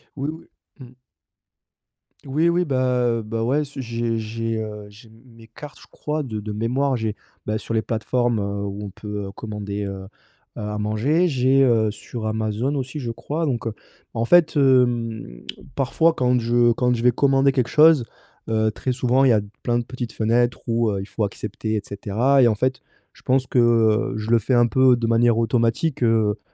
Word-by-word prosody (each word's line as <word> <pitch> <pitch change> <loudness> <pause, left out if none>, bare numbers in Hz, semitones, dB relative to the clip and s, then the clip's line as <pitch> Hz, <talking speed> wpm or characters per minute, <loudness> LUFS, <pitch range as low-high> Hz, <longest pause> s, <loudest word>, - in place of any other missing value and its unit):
Oui, 140 +1 -3
oui. 160 - -12 0.3
Mmh. 125 -1 -13 1.3
Oui, 155 +5 +1
oui 175 +1 +1
bah, 130 -3 +1
heu, - - -4
bah, 115 +1 -4
ouais, 140 +6 +1
ce 140 0 -10
j'ai 115 -1 -2
j'ai, 115 +1 -3
heu, 105 -1 -6
j'ai 105 +3 -16 0.2
mes 115 -2 -17
cartes, 145 +6 -12
je - - -15
crois 150 0 -3
de 110 -6 -5
de 105 +1 -6
mémoire. 130 +6 0
J'ai, 110 -3 -3 0.3
bah, 105 +1 -1
sur 115 - -6
les 110 - +2
plateformes, 120 +1 -1
heu, 100 0 -3
où 100 +1 -5
on - - -6
peut 105 0 -6
commander, 105 -2 -5
heu, 95 -1 -6 0.5
heu, - - -5
à 105 0 -4
manger, 120 +12 +1
j'ai, 135 -2 +2
heu, 115 -4 +3
sur 110 +2 -8
Amazon 110 +4 -1
aussi 135 +2 -4
je 120 -4 -4
crois 150 +8 -3
donc, 120 -6 -2
heu, 110 - -3 0.4
en 115 0 0
fait 175 +4 +4
hem, 120 - +1 0.3
parfois 160 +5 +2
quand 125 -3 +1
je 120 +1 +3
quand 125 +1 +1
je 115 - -4
vais 125 - +5
commander 135 +2 +3
quelque 130 -3 -1
chose, 155 -4 +5 0.4
heu, 110 -1 +1
très 120 +4 -3
souvent 130 +1 +2
il - - +5
y - - +6
a 105 - +2 0.2
pleins 120 -1 0
de 120 - -1
petites 120 -2 -6
fenêtres 120 +2 +1
où, 115 -1 +1
heu, 100 -1 -2
il - - -6
faut 105 +1 -2
accepter 105 +2 -4
et 105 - -1
cetera 110 +8 +1
et 120 - +6
en 110 - +2
fait 130 +4 -1 0.3
je - - -20
pense 130 0 +1
que, 125 - 0
heu, 115 -2 +3
je 110 +1 -4
le 115 - +5
fais 125 +4 0
un 120 0 +4
peu 130 +1 +4
de 120 -1 -2
manière 115 0 +3
automatique, 115 +6 0
heu, 110 -3 +2
115 Hz, 200 wpm, -22 LUFS, 110-130 Hz, 1.3 s, y